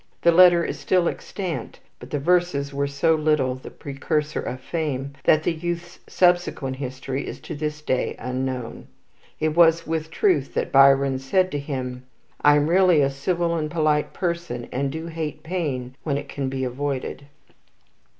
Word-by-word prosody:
The 170 - +6
letter 175 0 +7
is - - -4
still 180 -2 +2
extant; 185 -2 -5 0.2
but - - -11
the 150 - -1
verses 145 -3 +1
were 140 0 0
so 140 +4 +2
little 150 -4 +1
the 130 - -9
precursor 150 +2 -3
of 130 - -5
fame 140 -2 -3
that 155 0 +4
the 175 - +1
youth's 175 +1 -5
subsequent 175 -7 +1
history 130 +1 -4
is - - -6
to - - -7
this 150 0 -4
day 130 -3 -1
unknown. 125 -1 -4 0.5
It 155 - +1
was 165 +1 +4
with 160 0 -2
truth 165 -5 +1
that - - -1
Byron 135 -1 +5
said 185 +7 +1
of 145 -1 -3
himself: 125 -3 -4 0.4
"I 145 0 +6
am 145 0 +3
really 180 -2 +5
a 135 - +1
civil 170 +5 -1
and 155 -2 -2
polite 155 -2 +1
person, 170 -9 -3
and 135 +1 -1
do 160 +2 -5
hate 160 -2 -5
pain 145 -8 -3
when 140 -3 -1
it 145 0 -6
can 140 -1 -3
be 130 0 -3
avoided." 140 +2 -3
150 Hz, 170 wpm, -23 LUFS, 135-170 Hz, 0.5 s, letter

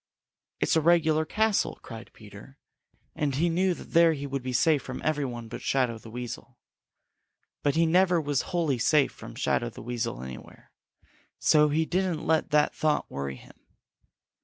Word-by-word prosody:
"It's - - +1
a 160 - +3
regular 160 -1 +3
castle!" 215 +4 0
cried 115 +1 -9
Peter, 105 +5 -14 0.6
and 145 -3 -1
he 170 +5 +2
knew 180 +2 +1
that - - -12
there 165 -1 +5
he 145 -2 -5
would 140 -1 -3
be 130 0 -4
safe 145 +3 +3
from 130 - -7
every 150 -2 0
one 120 -2 -6
but 120 - -8
Shadow 125 -4 0
the 115 - -12
Weasel. 120 +2 -7 1.0
But 145 - +1
he 165 +1 +4
never 180 +1 +3
was 145 -3 0
wholly 160 -8 0
safe 145 +3 +3
from - - -11
Shadow - - 0
the - - -11
Weasel 115 - -3
anywhere, 65 -1 -11 0.7
so 150 -1 +4
he 160 +2 +1
didn't 180 -2 -1
let 160 -1 +1
that 150 -1 +3
thought 155 -1 0
worry 70 -1 -4
him. - - -17
150 Hz, 170 wpm, -27 LUFS, 125-165 Hz, 1.0 s, there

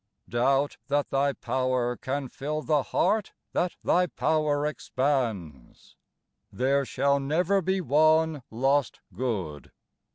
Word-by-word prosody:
Doubt 135 +4 +1
that 145 +1 0
Thy 140 +1 +2
power 125 0 -1
can 135 +2 -3
fill 150 +4 -4
the 150 -2 +2
heart 215 +8 0 0.2
that 180 - 0
Thy 180 0 +3
power 155 -3 0
expands? 120 - -3 0.6
There 140 +2 +1
shall 140 +2 +1
never 175 +8 +1
be 190 +2 0
one 155 0 +3
lost 135 +3 0
good 95 - -4
140 Hz, 110 wpm, -27 LUFS, 130-155 Hz, 0.6 s, Thy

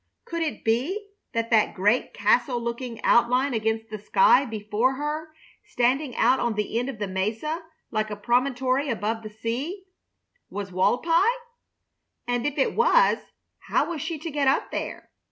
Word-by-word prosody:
Could 335 -1 -4
it 320 -2 -3
be 320 - 0 0.2
that 230 0 -2
that 220 -2 +3
great 210 +5 +2
castle 240 +4 +2
looking 235 0 -5
outline 250 +3 +3
against 220 0 -1
the 215 - -5
sky 280 - +4
before 220 +3 0
her, 300 +3 -3 0.3
standing 255 +2 0
out 250 +3 +3
on 235 -2 0
the 210 +2 -1
end 245 +2 -2
of 265 - -6
the 205 -1 -3
mesa 220 - -2 0.3
like 215 -1 -1
a 210 - -4
promontory 255 +5 +1
above 225 -1 -2
the 215 - -7
sea, 245 - -4 0.7
was 200 -1 -5
Walpi? 325 - +2 1.1
And 245 +2 0
if 290 - -4
it 270 - +2
was, - - +4 0.5
how - - +1
was 315 -4 -4
she 330 +1 -3
to 320 +2 -6
get 285 -1 0
up 270 - +2
there? - - -5
245 Hz, 160 wpm, -25 LUFS, 220-290 Hz, 1.1 s, sky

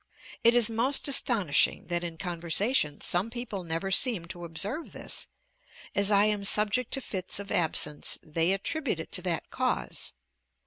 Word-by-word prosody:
It 235 +1 +6
is 240 -3 +5
most 235 +6 +1
astonishing 235 - +2
that 175 0 -1
in 170 -1 -6
conversation 170 - 0
some 180 +6 0
people 230 -5 -5
never 165 +3 -3
seem 210 -4 +3
to 175 -2 -7
observe 200 - -3
this; - - -3 0.7
as 200 0 +4
I 205 0 +5
am 210 -1 +1
subject 215 +4 +2
to 270 - 0
fits 185 -6 -2
of 200 0 -5
absence, 150 -3 +1
they 165 +3 +1
attribute 220 - -1
it 165 - -8
to - - -2
that 175 -2 -3
cause. 65 - -2
195 Hz, 160 wpm, -28 LUFS, 170-230 Hz, 0.7 s, It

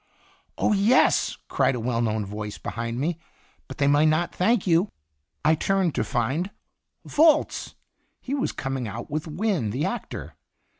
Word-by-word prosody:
"Oh, - - +2
yes!" 210 +5 +3
cried 135 - +2
a - - -3
well 115 0 -1
known 110 -2 0
voice 105 +1 -6
behind 115 +1 -4
me. 160 +4 -1 0.5
"But - - -9
they 145 - +2
might 145 +2 +4
not 155 +3 +1
thank 215 +3 +2
you." 175 +2 +3 0.6
I 155 - +6
turned 185 +1 +1
to - - 0
find 135 - -1 0.6
Volz! 310 0 +3 0.4
He 260 - -5
\vas 280 -1 0
coming 135 -3 -3
out 115 +6 -7
with 155 +2 -2
Wynne, 165 - -1
the 130 +8 -1
actor. - - -5
155 Hz, 155 wpm, -25 LUFS, 120-190 Hz, 0.6 s, I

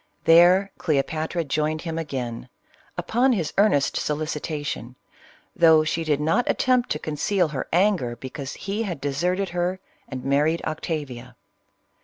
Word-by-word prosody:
There 180 +4 +6
Cleopatra 155 +3 -1
joined 155 +2 -1
him 165 -1 -4
4igain, 130 -7 -5 0.5
upon 250 +3 +2
his 170 -9 -2
earnest 170 -10 +3
solicitation, 150 -4 -3 0.6
though 160 -2 +6
she 165 +1 -1
did 150 -3 0
not 185 +12 +1
attempt 255 -1 +2
to - - -3
conceal 160 +4 0
her 145 -3 -4
anger 175 - +2
because 130 +3 -7
he 200 +3 -4
had 185 -9 -3
deserted 175 +8 -1
her, 180 +2 -2 0.3
and 130 0 -7
married 150 +4 +1
Octa 155 -1 -3
via. 125 -1 -11
155 Hz, 135 wpm, -24 LUFS, 145-180 Hz, 0.6 s, There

